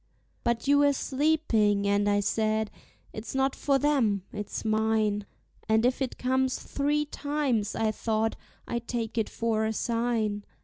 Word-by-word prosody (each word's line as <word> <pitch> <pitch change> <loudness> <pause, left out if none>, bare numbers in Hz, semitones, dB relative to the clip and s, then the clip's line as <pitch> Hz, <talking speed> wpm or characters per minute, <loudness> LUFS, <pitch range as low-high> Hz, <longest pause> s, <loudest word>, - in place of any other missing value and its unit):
But 235 +2 0
you 285 0 +5
were 285 0 +5
sleeping; 260 -9 +1
and 200 0 +2
I 205 0 +3
said, 215 +1 0 0.4
"It's 215 +4 -6
not 270 0 +1
for 275 -1 +2
them, 245 -9 +2
it's 210 +1 -5
mine;" 215 -1 +1 0.4
And 220 +1 +4
if 255 +2 +1
it 260 - -2
comes 260 0 +1
three 295 +1 -1
times, 285 -8 -1
I 220 -1 +1
thought, 220 0 -1 0.3
I 235 - -1
take 235 -1 -3
it 220 - -1
for 225 -1 0
a 220 0 0
sign. 230 -3 -1
225 Hz, 150 wpm, -28 LUFS, 215-265 Hz, 0.4 s, you